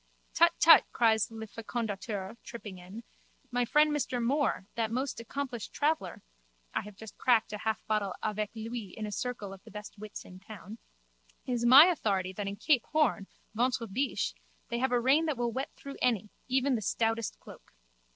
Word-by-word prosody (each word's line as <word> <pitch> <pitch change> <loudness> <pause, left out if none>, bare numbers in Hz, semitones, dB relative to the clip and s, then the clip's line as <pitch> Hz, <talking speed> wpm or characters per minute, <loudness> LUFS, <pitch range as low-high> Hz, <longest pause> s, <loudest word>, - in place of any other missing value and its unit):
Tut, 340 0 +6
tut! 330 0 +9
cries 220 -2 +3
Le 225 -1 -7
Fécondateur, 215 -2 -4
tripping 210 -6 -9
in, 190 +6 -10 0.5
my 245 0 +1
friend 300 +4 +4
Monsieur 260 -4 -1
Moore, 255 -4 +1
that 225 -1 -1
most 255 +3 -2
accomplished 245 -1 -5
traveller 310 +2 -1 0.5
(I - - 0
have 210 0 -11
just 220 +1 -12
cracked 230 -4 +3
a 210 - -4
half 220 +1 -2
bottle 210 -3 -1
avec 215 -1 -1
lui 225 -3 -6
in 215 - -3
a 210 - -5
circle 210 -3 -4
of 195 - -13
the - - -14
best 210 0 -9
wits 215 0 -8
of 185 0 -12
the - - -26
town), 215 +1 -10 0.7
is 240 -2 -1
my 270 +6 +11
authority 200 - 0
that 200 +1 -4
in 200 - -3
Cape 265 +2 +2
Horn, 300 -10 +1 0.3
ventre 245 +1 0
biche, 250 +7 -1 0.4
they 235 -1 -2
have 260 0 +1
a 245 - +3
rain 280 +7 +3
that 300 -5 -1
will 240 -1 0
wet 265 +5 -3
through 280 0 -9
any, 215 -4 +1 0.2
even 265 +1 +2
the 230 - 0
stoutest 225 +2 -1
cloak. - - -14
230 Hz, 185 wpm, -30 LUFS, 210-260 Hz, 0.7 s, my